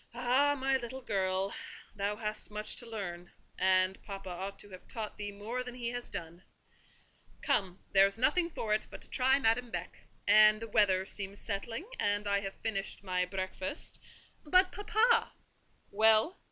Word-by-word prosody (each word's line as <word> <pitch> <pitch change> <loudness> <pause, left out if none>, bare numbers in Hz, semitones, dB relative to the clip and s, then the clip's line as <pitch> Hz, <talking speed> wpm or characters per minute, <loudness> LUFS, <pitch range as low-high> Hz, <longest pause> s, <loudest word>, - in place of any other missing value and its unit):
Ah, 255 +4 +3
my 270 0 +2
little 260 +1 -7
girl, 190 -2 -1 0.4
thou 205 +1 -1
hast 215 -1 -3
much 210 0 -1
to 235 - -4
learn; 180 -5 -6 0.3
and 185 0 +3
papa 195 -2 -7
ought 190 +3 -5
to 205 - -10
have 185 - -12
taught 220 -4 -5
thee 205 -1 -5
more 220 +5 -4
than 250 -1 -8
he 240 -2 -3
has 245 0 -5
done! 170 +1 -7 1.0
Come, 185 -2 0
there 195 0 +7
is 200 - -2
nothing 335 +8 +2
for 220 -9 -2
it 215 - 0
but - - -9
to - - -9
try 265 +1 +4
Madame 245 -1 +1
Beck; 180 -4 -5 0.3
and 215 +1 +7
the 230 - -6
weather 195 -4 +3
seems 200 0 -4
settling, 225 - -3
and 205 0 +1
I 200 0 +2
have 195 -1 -6
finished 195 -3 -3
my 180 -1 0
breakfast—" 185 - -5 0.4
"But, 370 +4 +4
papa!" 450 +3 +2 0.6
"Well?" 220 - +4
210 Hz, 165 wpm, -32 LUFS, 195-245 Hz, 1.0 s, there